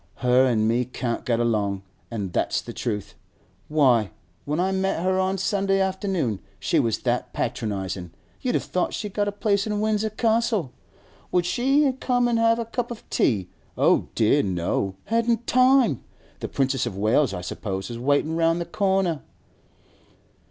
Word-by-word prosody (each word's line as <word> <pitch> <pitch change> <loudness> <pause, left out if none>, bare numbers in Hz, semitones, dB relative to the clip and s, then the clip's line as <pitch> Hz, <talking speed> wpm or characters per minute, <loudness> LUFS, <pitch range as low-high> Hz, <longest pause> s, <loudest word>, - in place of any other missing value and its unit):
Her 125 +1 +5
an' 110 -3 +2
me 120 +2 +2
can't 120 -1 -3
get 120 -2 +2
along, 105 -4 0 0.3
an' 105 -5 -3
that's - - 0
the - - -8
truth. 105 -4 -3 0.5
Why, 125 -9 +3 0.4
when 150 +3 -1
I 190 +2 +1
met 190 -3 0
her 185 0 +2
on 190 +1 +1
Sunday 195 0 +1
afternoon, 190 - -1 0.2
she 160 - +1
was 115 -5 +1
that 120 -1 -1
patronisin' 100 -7 -3 0.3
you'd 250 - 0
have - - +1
thought 180 - -1
she'd 210 -2 -5
got 205 -1 0
a - - 0
place 200 0 0
in 210 -1 -1
Windsor 215 0 +1
Castle. 220 - 0 0.6
Would 180 -1 +2
she 270 +7 +2
come 245 -1 +2
an' 235 -1 +1
have 230 0 +4
a 235 - -2
cup 240 +1 -3
of 235 -2 -9
tea? 95 -7 +1 0.3
Oh - - +3
dear, 115 +6 +4
no! 95 +1 -1
Hadn't 230 +1 +1
time! 255 - +4 0.4
The - - -4
Princess 135 -2 0
of 100 -5 -5
Wales, 110 +5 +2
I 90 - -4
suppose, 95 +1 -4
was 120 -1 -6
waitin' 145 +5 +1
round 165 +1 +2
the 170 - -2
corner! 190 -6 0
165 Hz, 165 wpm, -24 LUFS, -, 0.6 s, Her